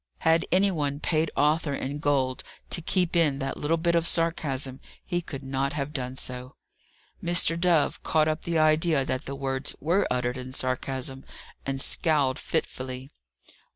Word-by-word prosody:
Had 160 Hz, 0 st, +3 dB
any 195 Hz, +3 st, +4 dB
one 145 Hz, -4 st, -1 dB
paid 155 Hz, 0 st, +1 dB
Arthur 150 Hz, 0 st, +2 dB
in 140 Hz, +2 st, -4 dB
gold 135 Hz, -3 st, +1 dB, 0.3 s
to -, -, 0 dB
keep 180 Hz, +1 st, +1 dB
in 155 Hz, -5 st, +4 dB
that 135 Hz, -1 st, -3 dB
little 160 Hz, +3 st, +1 dB
bit 170 Hz, +1 st, +1 dB
of 170 Hz, 0 st, +3 dB
sarcasm, 140 Hz, -6 st, +1 dB, 0.3 s
he 175 Hz, 0 st, -1 dB
could 140 Hz, -5 st, -7 dB
not 135 Hz, +1 st, -1 dB
have 145 Hz, 0 st, -3 dB
done 130 Hz, -2 st, -3 dB
so. 125 Hz, 0 st, -5 dB, 0.7 s
Mr. 170 Hz, -1 st, +3 dB
Dove 170 Hz, -4 st, +2 dB
caught 155 Hz, -1 st, +2 dB
up 155 Hz, 0 st, -1 dB
the 170 Hz, -1 st, -1 dB
idea 155 Hz, -2 st, +3 dB
that 130 Hz, -1 st, -2 dB
the 140 Hz, -, -5 dB
words 135 Hz, 0 st, -1 dB
were 175 Hz, +6 st, +2 dB
uttered 125 Hz, 0 st, -1 dB
in 130 Hz, 0 st, -7 dB
sarcasm, 130 Hz, +1 st, -2 dB, 0.4 s
and 135 Hz, 0 st, -2 dB
scowled 145 Hz, -2 st, +2 dB
fitfully. 130 Hz, -4 st, -3 dB
145 Hz, 160 wpm, -27 LUFS, 135-165 Hz, 0.7 s, any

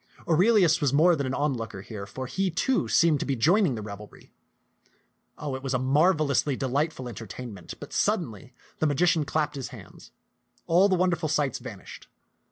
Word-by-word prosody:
Aurelius 175 Hz, -1 st, +4 dB
was 145 Hz, -3 st, +2 dB
more 165 Hz, +5 st, +5 dB
than 140 Hz, -3 st, -2 dB
an 130 Hz, -, -2 dB
onlooker 115 Hz, -9 st, -2 dB
here, 100 Hz, -1 st, -8 dB
for 130 Hz, +5 st, -6 dB
he, 190 Hz, +8 st, -1 dB
too, 240 Hz, +10 st, 0 dB
seemed 165 Hz, -4 st, +3 dB
to -, -, -2 dB
be 135 Hz, -, 0 dB
joining 170 Hz, -, +3 dB
the 110 Hz, -, -6 dB
revelry. 105 Hz, 0 st, -11 dB, 1.0 s
Oh, 145 Hz, -2 st, -4 dB
it 130 Hz, -, -5 dB
was 135 Hz, -1 st, -2 dB
a -, -, +3 dB
marvelously 145 Hz, +1 st, +2 dB
delightful 135 Hz, +1 st, -2 dB
entertain 115 Hz, +1 st, -8 dB
ment; 90 Hz, -4 st, -10 dB
but -, -, -10 dB
suddenly -, -, -1 dB, 0.2 s
the 155 Hz, -, +2 dB
magician 160 Hz, +1 st, +2 dB
clapped 150 Hz, +1 st, -1 dB
his 135 Hz, -3 st, -5 dB
hands. -, -, -13 dB, 0.6 s
All 180 Hz, +4 st, +4 dB
the 190 Hz, -, +3 dB
wonderful 175 Hz, -3 st, 0 dB
sights 145 Hz, -4 st, 0 dB
vanished. -, -, -10 dB
145 Hz, 175 wpm, -26 LUFS, 130-170 Hz, 1.0 s, more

